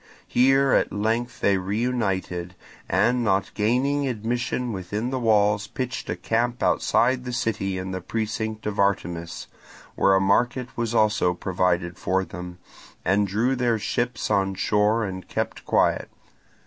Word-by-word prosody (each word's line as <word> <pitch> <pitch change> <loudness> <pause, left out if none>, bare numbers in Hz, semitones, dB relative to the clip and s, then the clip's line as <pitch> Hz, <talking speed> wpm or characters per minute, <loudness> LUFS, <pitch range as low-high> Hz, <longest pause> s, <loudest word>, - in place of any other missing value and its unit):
Here 135 +1 +4
at - - +3
length 115 +4 -1
they 100 -1 +3
reunited, 95 -4 -2 0.3
and 125 0 +2
not 100 -3 +1
gaining 135 +6 +1
admission 120 +1 -2
within 105 +6 -3
the 130 - -1
walls 105 -3 +2
pitched 130 -2 -4
a 85 - -1
camp 115 +6 -1
outside 125 +1 +2
the 125 - -5
city 105 -5 -1
in 95 0 -4
the 95 0 -4
precinct 110 +2 -3
of 105 -1 -3
Artemis, 85 -3 -1 0.5
where 95 - +3
a - - +4
market 120 +6 +1
was 120 -1 -2
also 105 -5 +3
provided 90 -1 -1
for 95 0 0
them, 90 -1 -8 0.5
and 100 +1 +2
drew 115 +7 +1
their 120 -2 +1
ships 120 +4 -2
on 95 -1 +1
shore 105 +3 +2
and 95 -1 -6
kept - - -3
quiet. - - +2
105 Hz, 145 wpm, -24 LUFS, 95-120 Hz, 0.5 s, Here